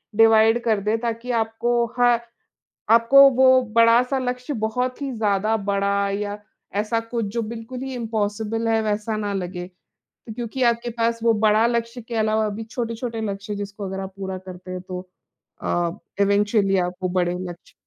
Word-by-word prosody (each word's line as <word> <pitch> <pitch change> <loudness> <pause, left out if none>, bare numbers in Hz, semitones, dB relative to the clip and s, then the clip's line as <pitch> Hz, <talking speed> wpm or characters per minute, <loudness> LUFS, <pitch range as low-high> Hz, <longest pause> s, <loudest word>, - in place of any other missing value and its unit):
Divide 225 +1 +5
कर 220 -3 +2
दें, 210 +3 0
ताकि 235 +1 -3
आपको 235 +2 0
ह 245 -1 +5 0.8
आपको 235 +4 +7
वो 260 0 +6
बड़ा-सा 235 +3 +5
लक्ष्य 250 +2 -3
बहुत 250 +4 -1
ही 275 -1 -2
ज़्यादा 215 -2 +1
बड़ा 200 0 0
या 205 +1 -3 0.4
ऐसा 215 +2 -1
कुछ 230 0 -3
जो 235 - 0
बिल्कुल 230 +3 -6
ही 265 0 -5
इम्पॉसिबल 220 -1 -2
है, 225 0 +2
वैसा 215 +1 -1
ना 205 -1 -2
लगे। 180 -2 -4 0.6
तो - - -5
क्योंकि 240 +2 -4
आपके 235 0 +1
पास 230 0 0
वो 230 0 +4
बड़ा 215 +2 +5
लक्ष्य 235 +1 -2
के 235 - -5
अलावा 220 0 +1
भी 210 +2 -5
छोटे-छोटे 230 0 -4
लक्ष्य 200 +1 -5
जिसको 200 0 -6
अगर 190 0 -4
आप 190 0 -6
पूरा 190 -1 -5
करते 185 0 -11
हैं, 185 0 -4
तो 180 0 -6 0.6
अ, 175 -1 0 0.3
इवेंचुअली 200 -1 +2
आप 180 0 -1
वो 185 - 0
बड़े 180 -1 0
लक्ष्य 175 +1 -11
220 Hz, 170 wpm, -23 LUFS, 200-235 Hz, 0.8 s, आपको